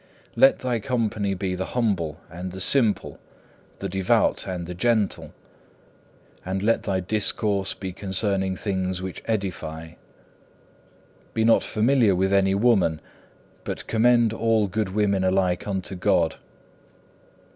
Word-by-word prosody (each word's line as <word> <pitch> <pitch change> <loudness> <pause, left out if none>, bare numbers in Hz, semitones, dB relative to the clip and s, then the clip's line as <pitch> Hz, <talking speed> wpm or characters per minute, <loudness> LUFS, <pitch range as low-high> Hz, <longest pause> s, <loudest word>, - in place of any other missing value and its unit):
Let 270 0 +5
thy 125 -2 -1
company 105 -5 -1
be 95 0 -3
the 95 +6 -5
humble 90 -10 0
and 90 +2 -7
the 95 - -7
simple, 115 +1 +2 0.6
the 100 - -4
devout 95 0 +1
and 90 -2 -4
the 90 - -6
gentle, 110 +1 0 1.1
and 95 +1 -3
let 115 +2 +2
thy 95 -2 -1
discourse 100 0 0
be 95 -2 -6
concerning 95 0 -1
things 95 -2 -2
which 95 -1 -6
edify. 90 -7 -3 1.5
Be 110 - +2
not 115 - +5
familiar 115 -2 +2
with 95 +2 +1
any 95 0 +3
woman, 100 -8 +2 0.6
but - - -5
commend 115 0 +3
all 115 -1 +2
good 105 +1 -2
women 100 -1 +1
alike 95 -1 +1
unto 95 -1 -3
God. 90 -3 +1
100 Hz, 125 wpm, -24 LUFS, 95-110 Hz, 1.5 s, Let